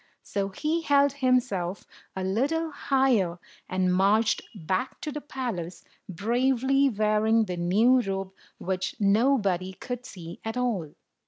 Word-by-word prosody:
So 195 Hz, -1 st, -2 dB
he 310 Hz, -, -1 dB
held 285 Hz, -2 st, +4 dB
himself 250 Hz, -9 st, 0 dB, 0.3 s
a 190 Hz, -, -3 dB
little 285 Hz, +12 st, 0 dB
higher, 260 Hz, -12 st, +1 dB, 0.3 s
and 185 Hz, 0 st, +1 dB
marched 205 Hz, +4 st, +3 dB
back 185 Hz, +6 st, -2 dB
to 305 Hz, -, -4 dB
the 300 Hz, -, -5 dB
palace, 195 Hz, -, -5 dB, 0.3 s
bravely 260 Hz, +7 st, +2 dB
wearing 215 Hz, 0 st, +2 dB
the 180 Hz, -3 st, -4 dB
new 215 Hz, +9 st, +4 dB
robe 195 Hz, -3 st, -3 dB, 0.3 s
which 185 Hz, 0 st, -3 dB
nobody 200 Hz, -4 st, +2 dB
could 245 Hz, +5 st, -6 dB
see 170 Hz, -3 st, -9 dB
at 225 Hz, +2 st, -4 dB
all. 215 Hz, -12 st, -2 dB
215 Hz, 130 wpm, -27 LUFS, 185-260 Hz, 0.3 s, held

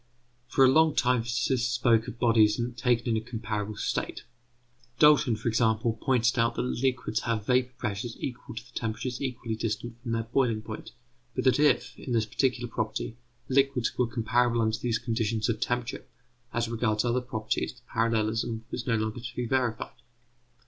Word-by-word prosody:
For 135 Hz, +1 st, +5 dB
a 130 Hz, -, +6 dB
long 160 Hz, +2 st, +4 dB
time 125 Hz, -1 st, +3 dB
physicists 120 Hz, +1 st, 0 dB
spoke 120 Hz, -2 st, +3 dB
of 115 Hz, -, -7 dB
bodies 115 Hz, -2 st, +4 dB, 0.2 s
taken 120 Hz, -1 st, +1 dB
in 110 Hz, -, +2 dB
a -, -, -15 dB
comparable 110 Hz, -3 st, -4 dB
state. -, -, -3 dB, 0.7 s
Dalton, 150 Hz, -5 st, +5 dB
for 110 Hz, +2 st, -5 dB
example, 115 Hz, 0 st, +1 dB
pointed 125 Hz, -1 st, +2 dB
out 115 Hz, 0 st, +2 dB
that -, -, -1 dB
liquids 125 Hz, -3 st, 0 dB
have 115 Hz, -3 st, -2 dB
vapour 125 Hz, +1 st, +2 dB
pressures 115 Hz, +1 st, -4 dB
equal 125 Hz, -1 st, -6 dB
to 110 Hz, -, -6 dB
the 125 Hz, -, -19 dB
temperatures 115 Hz, +2 st, -3 dB
equally 125 Hz, -4 st, -3 dB
distant 115 Hz, +2 st, -4 dB
from 115 Hz, -1 st, -3 dB
their 115 Hz, 0 st, 0 dB
boiling 115 Hz, -2 st, 0 dB
point; 110 Hz, -1 st, -8 dB, 0.4 s
but -, -, -1 dB
that 130 Hz, +1 st, +4 dB
if, 150 Hz, 0 st, +3 dB
in 125 Hz, -, -4 dB
this 115 Hz, -2 st, +2 dB
particular 120 Hz, +2 st, 0 dB
property, 110 Hz, 0 st, -3 dB, 0.3 s
liquids 135 Hz, -2 st, +2 dB
were 125 Hz, -, +1 dB
comparable 120 Hz, +1 st, +1 dB
under 110 Hz, 0 st, +1 dB
these 115 Hz, -2 st, 0 dB
conditions 115 Hz, -2 st, -1 dB
of 110 Hz, -2 st, 0 dB
temperature, 120 Hz, +1 st, -2 dB, 0.4 s
as 120 Hz, 0 st, 0 dB
regards 110 Hz, -1 st, 0 dB
other 120 Hz, +1 st, +1 dB
properties 110 Hz, -1 st, -2 dB
the 120 Hz, -, -20 dB
parallelism 115 Hz, 0 st, 0 dB
was 120 Hz, -, -4 dB
no 115 Hz, -, +3 dB
longer 110 Hz, +1 st, -2 dB
to 120 Hz, +2 st, -8 dB
be 125 Hz, -, -2 dB
verified. 120 Hz, -2 st, -1 dB
115 Hz, 175 wpm, -28 LUFS, 110-125 Hz, 0.7 s, a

